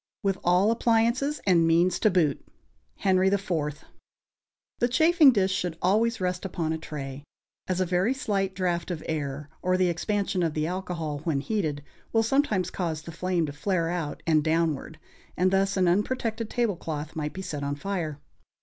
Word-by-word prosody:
= - - -68
With 195 -1 0
all 180 +5 +4
appliances 235 +5 +1
and 170 -4 +4
means 170 +2 +3
to 215 - +4
boot. 170 -7 +1 0.6
HENRY 190 -1 +3
IV., 195 -1 0
iii. 165 - +2
I. 150 - -2 1.1
The 240 - +3
chafing 315 +3 +6
dish 195 -5 +1
should 180 -3 -2
always 225 +5 +2
rest 180 -1 -2
upon 170 -4 -2
a 160 - -3
tray, 140 -3 -7 0.4
as 185 -1 -1
a 185 - +2
very 180 +6 +1
slight 200 -8 -1
draught 175 -2 -1
of 170 -3 -4
air, 145 -2 -3
or 185 0 +2
the 185 -1 +3
expansion 195 +2 -1
of 165 -3 0
the 155 0 0
alcohol 170 -4 -3
when 155 -2 -1
heated, 150 -5 -2 0.3
will 225 0 +4
sometimes 225 -7 +1
cause 160 -4 -3
the 165 - -8
flame 175 0 0
to 145 - -6
flare 170 +1 0
out 165 -4 -4
and 155 -3 +3
downward, 160 -1 0 0.4
and 185 +2 +3
thus 195 +1 +2
an 185 -1 +3
unprotected 220 +4 0
tablecloth 165 -10 -2
might 150 -1 -3
be 190 - -6
set 155 -6 -4
on 140 0 -2
fire. 160 -3 -3
180 Hz, 180 wpm, -27 LUFS, 160-200 Hz, 1.1 s, chafing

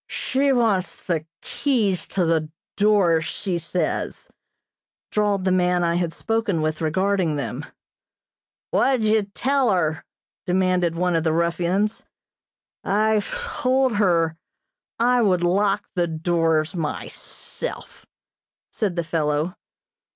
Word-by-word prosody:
"She 275 +2 0
wants 220 -7 +1
the 165 -3 -2 0.2
keys 220 -10 0
to 185 -3 0
the 160 -2 +1 0.3
doors, 195 -6 +3
she 180 0 -2
says," 170 0 -3 0.8
drawled 205 -2 +1
the 185 - +2
man 180 -1 +2
I 170 0 +2
had 175 -2 -1
spoken 220 -5 -1
with 155 0 -2
regarding 185 0 +1
them. 145 0 -4 1.0
"What 260 -3 +2
did 215 -1 +2
ye - - -31
tell 275 -2 +2
her?" 160 -4 0 0.4
demanded 180 -2 +1
one 180 0 +1
of 165 - +1
the 160 - +2
ruffians. 170 +5 0 0.8
"I 215 +1 +2
told 265 - 0
her 165 -5 +2 0.6
I 245 +1 +3
would 185 -5 +2
lock 195 +3 +1
the 175 -2 +1
doors 160 -1 0
myself," 165 - -6 0.6
said 200 -6 -2
the 170 - -1
fellow. 155 0 -1
180 Hz, 120 wpm, -23 LUFS, 165-210 Hz, 1.0 s, doors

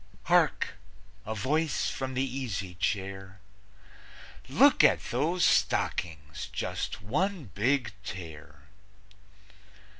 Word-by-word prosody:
(Hark! 170 - +2 0.5
A 110 - -2
voice 150 +8 0
from 130 -1 -4
the 130 - +1
easy 115 -8 -4
chair: 95 +1 -3 1.1
"Look - - +6
at - - +4
those 165 +9 +2
stockings! 80 -2 0
Just - - -4
one 150 - -1
big 115 +3 +1
tear!") 85 -5 -8
110 Hz, 90 wpm, -29 LUFS, 95-140 Hz, 1.1 s, Look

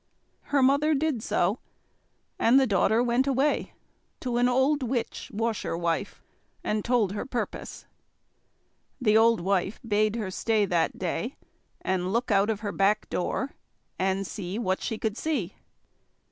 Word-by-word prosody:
Her 280 -2 +2
mother 285 +4 +4
did 290 -5 0
so; 195 +2 0 0.8
and 245 +4 +5
the 270 - +4
daughter 220 +2 +3
went 245 +2 +2
away 275 +2 +1 0.5
to 245 -2 -1
an 245 +1 +3
old 265 +4 +2
witch 245 -2 -3
washerwife 200 -5 -2 0.4
and 210 -1 -1
told 235 -6 +2
her 205 - -3
purpose. 250 -2 -5 1.1
The 215 -5 +3
old 225 -2 +5
wife 190 +2 0
bade 215 0 +2
her 210 -5 -3
stay 215 +1 +1
that 175 -3 0
day, 185 +7 -3 0.5
and 185 0 -1
look 235 +2 0
out 200 +1 +3
of 210 -2 -1
her 205 -2 -3
back 200 +4 +1
door, 265 +9 -1 0.5
and 190 +1 0
see 190 0 -5
what 190 -5 -1
she 225 - -3
could 220 0 -2
see. 265 - -2
220 Hz, 145 wpm, -27 LUFS, 195-250 Hz, 1.1 s, and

